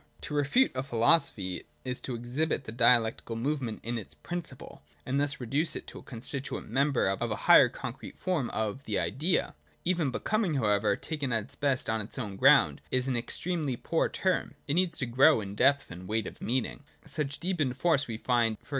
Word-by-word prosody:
To - - -6
refute 150 - +3
a 130 - -2
philosophy 115 - +2 0.2
is 125 -1 -3
to 130 - -4
exhibit 125 +8 -1
I - - -25
the 110 - -6
dialectical 115 -1 +3
movement 125 -1 -2
in 115 +1 -2
its 105 - -11
principle, 175 -1 -7 0.2
and 135 +2 0
thus 145 +1 0
reduce 140 +7 0
it - - -5
I - - -10
to - - -9
a - - -12
constituent 130 +1 -6
member 140 +2 +2
of 95 0 -1
a - - -1
higher - - +8
concrete - - -8
form 170 -9 -1
of 110 +5 -3
the 105 - -2
1 85 - +2
Idea. 145 - 0 0.3
Even 170 -5 +1
Becoming 205 - 0
however, 105 -4 +2
taken 145 +1 -3
at 115 -2 +1
its 115 - -14
best 140 -3 0
on 110 -1 0
its 105 - -8
own 105 -6 -4
ground, - - +5
is 130 0 0
an 130 - 0
extremely 150 +3 -2
poor - - 0
term: - - -1
it 140 - 0
needs 175 0 +1
to 130 - 0
grow 130 +4 +5
in 100 -2 -6
depth 135 +6 +3
and 90 +1 -9
weight 110 0 0
of - - -9
meaning. 125 +2 -1 0.2
Such 145 -2 -3
deepened 155 -8 -1
force 145 -1 +2
we 115 -2 -4
find 115 -2 +1
e. - - -30
130 Hz, 205 wpm, -29 LUFS, 115-150 Hz, 0.3 s, higher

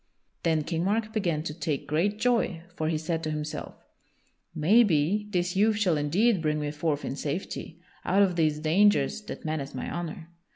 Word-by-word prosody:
Then 160 -2 +1
King 165 +2 -2
Mark 215 +3 0
began 170 -8 0
to 150 - -4
take 150 -3 -3
great 185 +8 0
joy, 225 -8 +1
for 155 -2 -1
he 160 - 0
said 160 +1 -2
to 155 - -2
himself: 150 0 -4 0.8
"Maybe 195 +2 +3
this 180 -2 -1
youth 210 +2 +3
shall 190 -6 +2
indeed 180 +8 +2
bring 150 -1 0
me 150 -1 -2
forth 150 -1 -2
in - - -3
safety 165 +2 -5 0.2
out 195 +3 +4
of 185 -3 +1
these 155 -3 +2
dangers 160 +1 +3
that - - -8
menace 150 -4 -3
my 130 - -4
honor." 170 -1 -5
165 Hz, 175 wpm, -27 LUFS, 155-200 Hz, 0.8 s, out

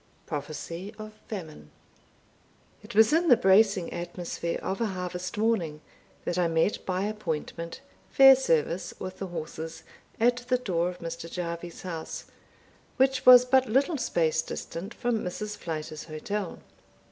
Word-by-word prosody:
Prophecy 165 +6 -6
of 215 0 -8
Famine. 155 - -7 1.1
It - - -11
was 220 +4 +6
in 335 +2 +3
the 245 - +7
bracing 195 -1 +4
atmosphere 175 -1 -4
of 195 +4 -2
a 230 - +2
harvest 180 -1 -4
morning, 200 -9 0 0.5
that 175 +1 -1
I 175 - +3
met 165 +5 +1
by 185 0 0
appointment 170 - -4 0.3
Fairservice, 255 - +5
with 185 0 -6
the 195 - -3
horses, 160 -1 -6 0.4
at 240 +2 +4
the 250 +1 0
door 180 -8 0
of 180 - -9
Mr. 165 0 -6
Jarvie's 170 -1 -5
house, 165 -3 -5 0.7
which 265 -1 +2
was 250 0 +10
but 260 0 +3
little 275 +6 +2
space 160 -8 +1
distant 170 +4 -6
from 240 -1 -1
Mrs. 210 +3 -4
Flyter's 155 -3 -5
hotel. 175 +5 -4
185 Hz, 135 wpm, -28 LUFS, 165-220 Hz, 1.1 s, was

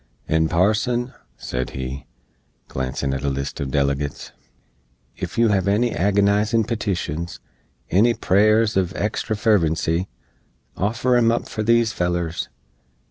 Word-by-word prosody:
"And, 80 0 +2
Parson," 110 +7 +1 0.2
sed 60 0 -4
he, 65 +1 -5 0.6
glancin' 65 +1 -3
at 70 0 -3
a 70 - +1
list 70 0 -4
uv 70 - -3
delegates, 70 0 -1 0.9
"ef - - -5
yoo 115 -1 +4
hev 100 -2 +1
any 110 +4 +2
agonizin 100 +4 +2
petitions, 95 -7 -3 0.5
any 115 +6 +4
prayers 110 +1 +3
uv 95 -1 0
extra 110 +1 -2
fervency, 85 -4 +1 0.7
offer 115 +5 +1
em 115 -1 +4
up 115 - -1
for 110 - -4
these 115 +1 +3
fellers. 85 -1 -2
100 Hz, 125 wpm, -22 LUFS, 80-110 Hz, 0.9 s, yoo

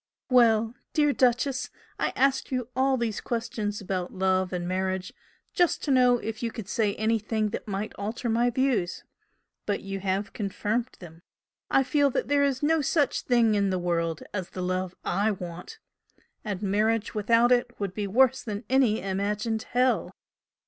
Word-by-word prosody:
Well, 225 -2 +4 0.2
dear 295 -2 +3
'Duchess,' 255 +1 +1 0.3
I - - +1
asked 270 0 +1
you 250 -2 -2
all 265 0 +2
these 230 -3 -2
questions 220 -3 -3
about 185 -2 -3
love 190 -1 +1
and 175 -1 -3
marriage 185 0 -2 0.4
just 350 -2 +2
to 290 - 0
know 250 -2 +5
if 225 -2 -5
you 235 -1 -2
could 220 -4 -7
say 210 -1 0
anything 220 0 0
that 215 - -6
might 200 +1 -3
alter 220 +4 -3
my 235 +2 +2
views 245 -8 0 0.6
but 205 -1 -1
you 195 0 -5
have 195 +2 -2
confirmed 215 +4 -2
them. 165 -1 -12 0.5
I 270 - +4
feel 285 +1 +2
that 270 - -2
there 285 0 +3
is 280 0 0
no 320 +1 +3
such 290 0 +1
thing 235 -3 +3
in 200 -1 +2
the 185 - 0
world 170 -2 -1
as 185 -3 -3
the 185 - -5
love 185 0 -2
I 205 +2 +1
want 180 - -6 0.7
and 205 -2 -4
marriage 210 +2 +1
without 230 +3 +3
it 245 -1 +1
would 200 -3 -3
be 205 0 -3
worse 260 +5 +3
than 210 0 -5
any 250 -6 +3
imagined 205 +3 -2
hell. 250 +1 +2
220 Hz, 170 wpm, -27 LUFS, 195-250 Hz, 0.7 s, know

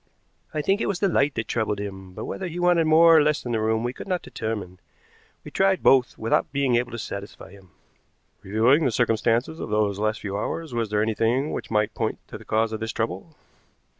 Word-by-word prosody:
"I 150 - -2
think 195 +6 +1
it - - 0
was 200 - -1
the 200 - +2
light 145 -5 +1
that 115 - -3
troubled 110 -3 -1
him, 95 -2 -7
but - - -6
whether 190 - -4
he 170 0 -7
wanted 175 -2 +3
more 165 +1 +7
or 155 - +7
less 150 -1 0
in 120 - -3
the 115 - 0
room 110 +1 0
we 120 +1 -2
could - - -9
not 180 -2 -1
determine. 105 -5 -5 0.6
We - - -10
tried 195 -1 +2
both 130 -2 +4
without 115 - 0
being 135 -3 +1
able 120 +1 0
to - - -4
satisfy 100 -3 -7
him." 95 -2 -17 0.7
"Reviewing 115 +10 +3
the 130 - +2
circumstances 120 +5 +1
of - - -5
those 105 -2 0
last 110 +1 -1
few 100 -2 -4
hours, 155 +7 -4
was 115 -2 -1
there 105 0 +1
anything 115 +6 0
which - - -5
might 105 0 +1
point 110 -2 -2
to - - -8
the - - -14
cause 110 +1 +1
of 110 - -3
this 110 0 -3
trouble?" 115 +9 -4
115 Hz, 225 wpm, -24 LUFS, 110-150 Hz, 0.7 s, more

